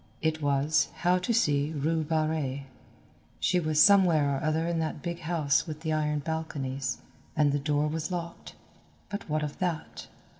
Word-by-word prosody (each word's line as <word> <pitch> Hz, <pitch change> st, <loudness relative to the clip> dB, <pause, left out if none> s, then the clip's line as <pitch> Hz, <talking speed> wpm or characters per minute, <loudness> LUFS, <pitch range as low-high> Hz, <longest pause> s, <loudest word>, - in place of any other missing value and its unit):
It 160 Hz, -1 st, -1 dB
was, 140 Hz, 0 st, +2 dB
how 180 Hz, +1 st, +4 dB
to 180 Hz, -, -2 dB
see 150 Hz, -9 st, +2 dB
Rue 160 Hz, +3 st, 0 dB
Barrée. 155 Hz, -3 st, -1 dB, 0.8 s
She 180 Hz, -, +2 dB
was 155 Hz, -2 st, 0 dB
somewhere 165 Hz, -8 st, +5 dB
or -, -, -4 dB
other 155 Hz, +1 st, +1 dB
in 170 Hz, -1 st, -1 dB
that 160 Hz, -2 st, -3 dB
big 170 Hz, -1 st, -4 dB
house 160 Hz, -4 st, +1 dB
with 155 Hz, -1 st, -6 dB
the 160 Hz, -1 st, -1 dB
iron 150 Hz, -1 st, 0 dB
balconies, 140 Hz, -5 st, -3 dB, 0.4 s
and 150 Hz, -2 st, +3 dB
the 145 Hz, -, 0 dB
door 145 Hz, +1 st, +1 dB
was 160 Hz, +2 st, -3 dB
locked, 170 Hz, -2 st, -6 dB, 0.6 s
but 205 Hz, -4 st, -5 dB
what 155 Hz, 0 st, 0 dB
of 150 Hz, -1 st, -5 dB
that? 175 Hz, -4 st, -3 dB
155 Hz, 165 wpm, -28 LUFS, 145-165 Hz, 0.8 s, somewhere